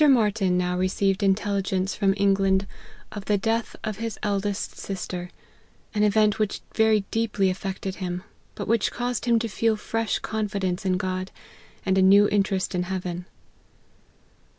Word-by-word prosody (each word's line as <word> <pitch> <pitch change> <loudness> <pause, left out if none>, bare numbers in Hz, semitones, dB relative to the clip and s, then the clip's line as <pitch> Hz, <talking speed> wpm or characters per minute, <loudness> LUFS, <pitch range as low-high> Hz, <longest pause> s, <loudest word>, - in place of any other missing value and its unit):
MARTYN 215 -9 +4
now 180 0 0
received 190 +1 +1
intelligence 195 -1 +1
from 195 -2 +2
England 195 -1 +3 0.5
of 205 -1 -7
the 210 - +2
death 225 +3 -1
of 215 -2 -3
his 230 0 -4
eldest 205 -1 -1
sister, 180 -2 -5 0.6
an 210 - 0
event 210 0 +3
which 215 -2 -1
very 220 -1 +4
deeply 210 -4 +1
afflicted 190 0 -4
him; 180 -1 -4 0.3
but - - -5
which 230 -1 +2
caused 245 -1 -2
him 235 -1 +4
to 230 0 -1
feel 225 +1 +1
fresh 225 +1 -1
confidence 200 -3 -2
in 185 -1 +2
God, 185 0 -2 0.6
and 190 0 +3
a - - +5
new 200 +2 +7
in 205 0 +3
terest 190 -2 -1
in 180 - 0
heaven. 180 -1 -4
200 Hz, 150 wpm, -25 LUFS, 190-215 Hz, 0.6 s, new